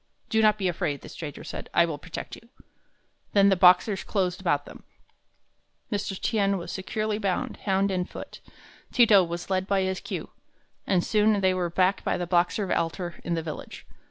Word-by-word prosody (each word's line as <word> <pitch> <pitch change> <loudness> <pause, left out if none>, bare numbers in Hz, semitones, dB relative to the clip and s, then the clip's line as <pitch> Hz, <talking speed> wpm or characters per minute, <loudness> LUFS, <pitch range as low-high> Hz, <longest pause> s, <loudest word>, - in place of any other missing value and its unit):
"Do 220 -1 +2
not 215 -1 +4
be 195 -3 -1
afraid," 150 -5 -2
the - - -11
stranger 150 -4 -7
said; - - -7
"I 170 - +6
will 155 -3 -5
protect 180 +3 -7
you." 230 - -18 0.8
Then 200 -1 +6
the 195 - +4
Boxers 185 +2 +5
closed 185 -3 -1
about 145 -6 +1
them. - - -12 1.1
Mr. 205 -2 -2
Tien 200 -3 +1
was 170 - -6
securely 215 +2 -2
bound, 195 -4 -2
hand 195 0 +1
and 180 -1 -2
foot. - - -9 0.5
Ti 240 - +6
to 205 -4 +6
was 170 +2 -5
led 190 0 0
by 195 -1 +2
his 190 0 -1
queue, - - -6 0.6
and 180 -3 +2
soon 210 -1 +2
they 190 -1 +3
were 180 -2 -1
back 185 +3 +1
by - - 0
the 180 - -2
Boxer 180 +3 +1
altar 175 +1 -2
in 170 - -1
the 165 - -2
village. 155 -2 -8
190 Hz, 185 wpm, -26 LUFS, 175-200 Hz, 1.1 s, I